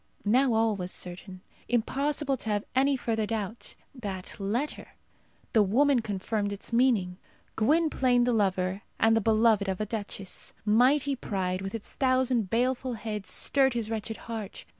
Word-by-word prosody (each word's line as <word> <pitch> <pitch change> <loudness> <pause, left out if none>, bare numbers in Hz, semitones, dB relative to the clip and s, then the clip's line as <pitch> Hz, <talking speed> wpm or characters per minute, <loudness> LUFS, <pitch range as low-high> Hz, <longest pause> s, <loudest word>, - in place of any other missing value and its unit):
Now 250 +4 +3
all 225 -1 +2
was 180 -2 -4
certain. 185 +1 -7 0.3
Impossible 275 +4 0
to 225 - -5
have 205 -1 0
any 270 +1 +3
further 220 -3 -1
doubt. 220 0 -4 0.2
That 200 -8 -6
letter! 230 +9 -3 0.6
the 220 - +5
woman 255 +7 +3
confirmed 205 0 -2
its 200 +3 -7
meaning. 220 -7 +2 0.4
Gwynplaine 260 -1 +3
the 245 0 +2
lover 190 -2 0 0.2
and 225 0 +4
the 225 - +2
beloved 220 -1 +3
of 190 - -2
a 215 - -1
duchess! 205 -3 -4
Mighty 260 +6 +3
pride, 190 -6 -2
with 195 +3 -5
its 220 - -6
thousand 255 -5 +1
baleful 250 +2 0
heads, 210 -3 -5
stirred 270 -3 +2
his 230 -2 -2
wretched 220 0 -4
heart. 220 -4 -6
225 Hz, 150 wpm, -28 LUFS, 200-255 Hz, 0.6 s, the